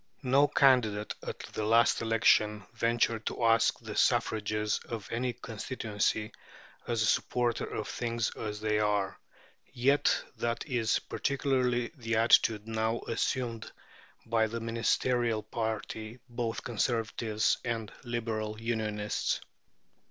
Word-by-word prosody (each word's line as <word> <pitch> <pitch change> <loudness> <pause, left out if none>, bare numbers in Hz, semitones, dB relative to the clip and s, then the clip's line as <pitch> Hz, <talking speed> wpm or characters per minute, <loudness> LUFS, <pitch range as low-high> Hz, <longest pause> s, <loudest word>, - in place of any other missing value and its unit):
No 135 +3 +4
candidate 115 -8 +3
at - - -5 0.2
the 110 - -2
last 115 +2 +4
election 105 -2 +3
ventured 115 -1 +1
to - - -3
ask 115 0 +4
the - - -7
suffrages 105 0 +1
of 115 -4 -5
any 125 +2 0
constituency 110 -2 -2 0.6
as 115 -2 +1
"a - - +2
supporter 120 +2 +1
of - - -3
things 115 -1 -2
as 105 -1 -5
they 105 -1 +1
are." 105 -2 0 0.5
Yet 140 +4 +2
that 120 0 -2
is 120 -5 +1
practically 130 -3 0
the 115 -4 -2
attitude 110 -1 +4
now 110 +1 -1
assumed 115 -1 -2 0.5
by 115 -1 +2
the 115 +2 -4
Ministerial 115 0 0
party, 110 +1 -4
both 120 -2 -3
Conservatives 115 -2 0
and 115 -3 -3
Liberal 110 -3 -3
Unionists. 110 -2 -1
115 Hz, 115 wpm, -30 LUFS, 110-120 Hz, 0.6 s, No